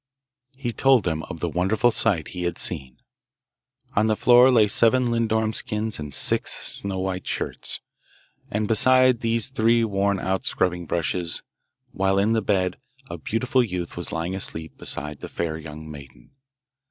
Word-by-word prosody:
He 120 -3 -3
told 135 -4 +4
them 80 -3 -1
of 80 - -7
the 85 - 0
wonderful 95 +8 +2
sight 100 -10 0
he 90 - -6
had 85 - -2
seen. 65 -7 -3 1.0
On 105 +2 +3
the 110 - +2
floor 125 +3 +6
lay 115 -5 +5
seven 120 +4 +3
lindorm 110 -1 0
skins 110 -2 -2
and 75 -1 -6
six - - +2 0.3
snow 100 -1 -4
white 95 -1 -3
shirts, - - -4 0.7
and 105 0 -1
beside 130 +2 +5
these 115 +1 0
three 115 -2 +2
worn 100 -2 0
out 95 +1 -1
scrubbing 90 -2 -1
brushes, 85 +1 -2 0.5
while 95 0 +1
in 105 +3 +2
the 110 - +1
bed 95 -3 0 0.3
a 85 - -6
beautiful 125 +7 +1
youth 90 -6 -4
was 85 - -5
lying 85 +3 -3
asleep 80 -4 -3
beside 75 0 -5
the - - -8
fair 80 -2 -3
young 80 0 -9
maiden. 70 -3 -13
100 Hz, 160 wpm, -24 LUFS, 85-115 Hz, 1.0 s, floor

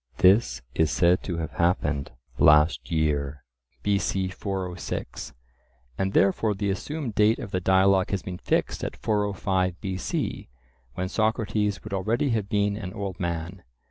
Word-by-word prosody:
This 95 - +4
is 80 -1 +2
said 85 +6 +3
to 85 -3 -3
have 80 -2 -3
happened 80 -5 0 0.3
"last 75 -4 +5
year" 75 -4 0 0.4
(B.C. 100 -2 0
406), 95 - -5 0.6
and 95 +8 -1
therefore 100 +2 +3
the 100 0 -1
assumed 140 - -4
date 105 +2 +4
of 100 - -7
the 95 - 0
dialogue 95 +1 +4
has 100 -2 -2
been 90 -1 -6
fixed - - -1
at - - -4
405 95 -3 0
B.C., 95 -2 -3 0.5
when 90 - -2
Socrates 105 -1 0
would 110 - -7
already 115 +8 0
have 105 -3 -1
been 100 0 +1
an 95 -4 -6
old 100 -2 -4
man. 85 +1 -3
95 Hz, 140 wpm, -26 LUFS, 85-105 Hz, 0.6 s, last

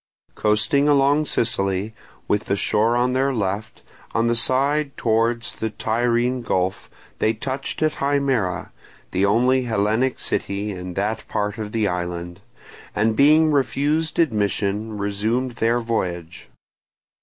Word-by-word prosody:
Coasting 110 +7 +2
along 145 +1 +3
Sicily, 100 -3 0 0.3
with 105 +1 0
the 100 - 0
shore 110 +4 +1
on 125 +1 +1
their 135 +1 +2
left, 110 -2 -3 0.3
on 115 - +2
the 120 0 +2
side 140 +4 +1
towards 115 +1 0
the 110 - -3
Tyrrhene 120 +3 0
Gulf 95 -5 -1 0.3
they 110 - +2
touched 130 +6 -4
at 155 -1 0
Himera, 135 -10 0 0.4
the 95 +2 +2
only 125 +5 +3
Hellenic 110 +3 +1
city 100 +1 -2
in 90 -2 -7
that 105 +3 -2
part 105 +1 -2
of 105 -1 -5
the 110 -2 +1
island, 90 0 -4 0.5
and 110 +1 +2
being 155 +4 +5
refused 145 +3 0
admission 105 - 0
resumed 110 +5 -1
their 115 +2 +2
voyage. 90 -7 -4
115 Hz, 130 wpm, -22 LUFS, 100-130 Hz, 0.5 s, being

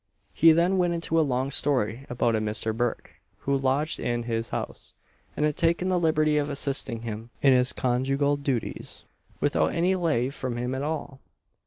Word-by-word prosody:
He 165 +1 +6
then 175 +4 +2
went 175 -1 +1
into 165 -1 0
a - - +5
long 135 -2 -1
story 130 -3 +1
about 120 -1 +1
a 110 - 0
"Misther 110 +1 -1
Burke" 120 +1 -2 0.3
who 140 - 0
lodged 135 +3 0
in 120 0 -2
his 115 -1 -3
house, - - -6 0.4
and 150 - +2
had 150 -1 0
taken 170 +2 +1
the 180 -1 +2
liberty 155 -2 +2
of 145 0 0
assisting 135 -4 0
him 115 0 -6
in 135 -2 +6
his 125 0 +4
conjugal 135 +3 0
duties, 135 -5 -3 0.4
"without 80 - +1
any 175 +3 +2
lave 150 -8 0
from 125 -4 -4
him 125 +1 -2
at 130 - -3
all." 145 -2 -4
135 Hz, 180 wpm, -26 LUFS, 120-155 Hz, 0.4 s, He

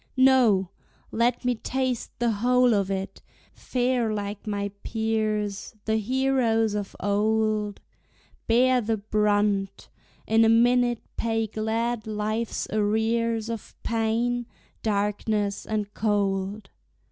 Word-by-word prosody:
No! 245 -8 +4 0.4
let 240 +2 +1
me 250 - +3
taste 255 +1 -3
the 240 -1 +1
whole 245 +3 +3
of 200 -2 +1
it, 195 0 -4 0.3
fare 245 -2 0
like 205 0 -4
my 200 -1 -2
peers 215 -2 -2
The 220 0 +1
heroes 235 -2 +1
of 205 -1 -4
old, 210 +1 0 0.7
Bear 250 +2 +4
the 225 0 -1
brunt, 205 -1 0 0.4
in 225 +1 +4
a 225 - +5
minute 240 +1 +3
pay 225 -1 0
glad 220 +1 -2
life's 215 +2 -2
arrears 220 +2 +1
Of 230 -2 -6
pain, 230 +1 0 0.3
darkness 205 -1 -1
and 210 -1 -2
cold. 200 -1 -1
220 Hz, 110 wpm, -26 LUFS, 205-235 Hz, 0.7 s, a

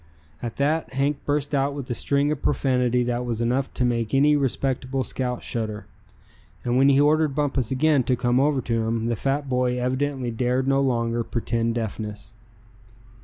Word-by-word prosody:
At 120 -2 -5
that 150 +3 0
Hank 140 +2 +1
burst 145 0 -1
out 140 0 0
into 135 -3 -5
a - - +1
string 140 +4 +1
of 150 - -3
profanity 125 -3 +1
that 120 0 -1
was 120 -2 -3
enough 125 +3 0
to 125 - +1
make 115 -1 0
any 145 +2 +5
respectable 135 -1 -1
scout 125 0 -3
shudder. 110 -3 -3 0.8
And 120 0 0
when 135 +2 +5
he 140 0 +4
ordered 150 -1 +3
Bumpus 140 -5 0
again 145 +1 +3
to 130 - +2
come 120 +1 +1
over 140 -1 +2
to 115 -1 -1
him, 115 0 -1
the 115 0 0
fat 140 +5 -1
boy 125 -1 0
evidently 130 0 -1
dared 125 +3 0
no 135 0 +3
longer 115 -3 0
pretend 115 0 -1
deafness. 110 -2 -5
130 Hz, 175 wpm, -24 LUFS, 120-140 Hz, 0.8 s, any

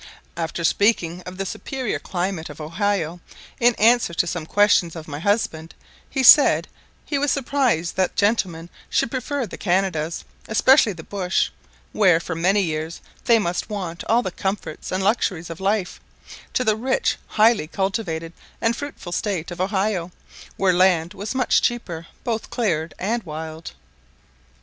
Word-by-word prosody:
After 170 0 -3
speaking 180 -3 +2
of 180 0 -8
the 195 - -2
superior 260 +5 -3
climate 180 -2 -3
of - - -10
Ohio, 170 +1 -1 0.4
in 240 -1 +4
answer 225 -5 +3
to 175 - +2
some 165 -1 -4
questions 205 -4 +3
of 160 -1 -8
my 145 -1 -6
husband, 165 -4 -1 0.3
he 265 -1 -1
said, 285 +3 +7 0.4
he 285 - -1
was 285 0 +1
surprised 255 - 0
that 185 -1 +1
gentlemen 190 -6 0 0.2
should - - +1
prefer 265 +1 -2
the 195 - -9
Canadas, 175 -4 0 0.2
especially 230 0 +4
the 165 -2 -10
bush, 190 -1 -1 0.4
where 185 -6 +4
for 170 - -5
many 190 +5 +2
years 160 0 -3 0.3
they 235 - +6
must 180 -3 -2
want 180 -5 -5
all 235 +2 +3
the 185 - -3
comforts 195 +2 -4
and 185 +1 -1
luxuries 185 -5 0
of 165 - -8
life, 195 -1 -1 0.5
to 255 - +2
the 215 -3 +2
rich, 255 +4 0
highly 215 -6 +3
cultivated, 180 -3 -2 0.3
and 230 +1 +1
fruitful 280 -10 -7
state 175 -2 -2
of 175 - -5
Ohio, 190 -2 0 0.5
where 190 -2 +3
land 175 -2 +3
was 205 +6 -5
much 255 -1 +3
cheaper, 175 -9 -2 0.2
both 225 -2 -3
cleared 165 -9 -1
and 230 +5 -1
wild. 160 -2 -7
190 Hz, 155 wpm, -22 LUFS, 170-220 Hz, 0.5 s, said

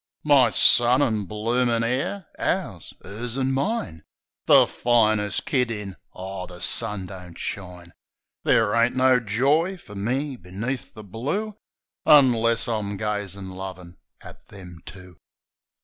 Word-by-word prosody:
My 140 -5 +5
son 120 +4 +4
an' 110 -5 0
bloomin' 115 +3 0
'eir... 135 +11 -2
Ours!... - - -2
'Ers 120 +4 -6
an' 135 0 0
mine! 135 - -2 0.4
The - - +7
finest 110 -4 +1
kid 125 -4 +1
in 105 -4 -6
— - - -46
Aw, 95 0 -7
the 90 -1 -12
sun 95 +2 -3
don't 90 -2 -11
shine 90 -3 -7 0.3
— - - -65
Ther' 105 -2 +3
ain't 115 +2 +2
no 130 -1 +4
joy 140 - +1
far 105 - -14
me 130 +7 -2
beneath 110 +9 -6
the 110 - -10
blue 145 - -4 0.5
Unless 115 -5 +5
I'm 105 -3 -3
gazin' 100 -2 -3
lovin' 95 -2 -9 0.2
at - - -14
them 90 -4 -12
two. 90 -3 -12
110 Hz, 135 wpm, -24 LUFS, 95-125 Hz, 0.5 s, The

